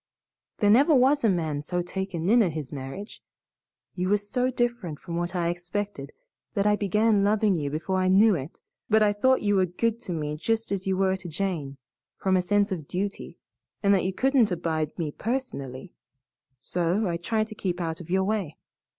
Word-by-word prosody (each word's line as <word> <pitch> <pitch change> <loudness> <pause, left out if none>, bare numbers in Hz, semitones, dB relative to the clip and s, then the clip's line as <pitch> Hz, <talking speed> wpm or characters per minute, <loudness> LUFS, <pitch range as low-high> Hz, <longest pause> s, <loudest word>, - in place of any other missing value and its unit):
There 205 -2 +4
never 285 +7 +6
was 270 +2 +4
a 225 - +4
man 160 -6 -1
so 175 +4 -2
taken 185 -2 -4
in 235 +4 +5
at 180 -7 +1
his 150 -4 -6
marriage. 140 +10 -7 0.7
You 180 0 -2
were 205 - +4
so 245 +5 -1
different 240 -10 -2
from 170 -2 -6
what 175 +1 -2
I 170 -1 +1
expected 175 -3 -4 0.4
that 200 -1 +1
I 210 0 +4
began 210 +1 +2
loving 210 0 +3
you 150 -5 -1
before 160 +6 -2
I 185 0 +1
knew 200 +4 +6
it, 145 -3 -5 0.3
but 215 0 +5
I 205 -1 +3
thought 260 +6 +2
you 205 -1 +2
were 185 -1 +3
good 230 +6 -1
to 190 - -6
me 150 -2 -3
just 225 +7 -1
as 195 -1 -2
you 190 -1 +1
were 190 0 +2
to 180 -2 -9
Jane 155 -5 -3 0.4
from 190 -1 +1
a 185 - +3
sense 205 +3 +1
of 160 -6 -4
duty 195 +2 -4 0.5
and 200 0 +5
that 190 - +2
you 185 - 0
couldn't 260 +1 +3
abide 165 -4 -2
me 160 -4 -2
personally. 175 - -4 0.7
So 180 +8 0
I 170 -1 -1
tried 215 +5 0
to - - -7
keep 185 -3 -3
out 165 -1 -3
of 170 - -12
your 190 +1 +2
way. 195 -6 -2
190 Hz, 200 wpm, -26 LUFS, 170-210 Hz, 0.7 s, never